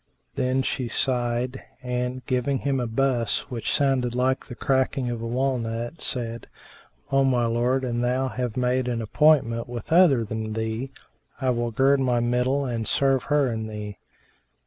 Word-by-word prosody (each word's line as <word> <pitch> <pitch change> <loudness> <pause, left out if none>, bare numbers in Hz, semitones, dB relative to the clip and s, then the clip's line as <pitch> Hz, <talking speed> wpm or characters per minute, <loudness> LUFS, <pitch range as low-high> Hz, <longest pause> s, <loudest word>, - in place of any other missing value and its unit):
Then 130 +1 0
she 130 -1 -2
sighed 120 +1 0 0.2
and, 125 0 -3
giving 130 +2 0
him 135 0 -1
a 120 - -1
buss 120 0 0
which 115 -3 -2
sounded 130 -4 +1
like 130 +1 0
the 120 - -8
cracking 130 -1 0
of 115 -1 -4
a 115 - -3
walnut, 120 +1 -2
said, 115 -2 -2 0.6
"O 135 0 +4
my 125 -3 +2
lord, 120 +3 +1
an 120 -2 -1
thou 125 +2 +1
have 125 -2 -3
made 125 0 +1
an 120 -2 -1
appointment 115 -2 +3
with 120 +3 -7
other 165 -9 +5
than 110 0 -4
with - - -6
me, 110 +4 -3 0.5
I 130 -2 +1
will 120 -1 -1
gird 135 +4 +3
my 125 -2 +2
middle 125 +4 +1
and 115 -3 -2
serve 135 -2 +2
her 145 -1 +2
and 110 -1 -4
thee. 105 -1 -7
125 Hz, 170 wpm, -25 LUFS, 115-130 Hz, 0.6 s, other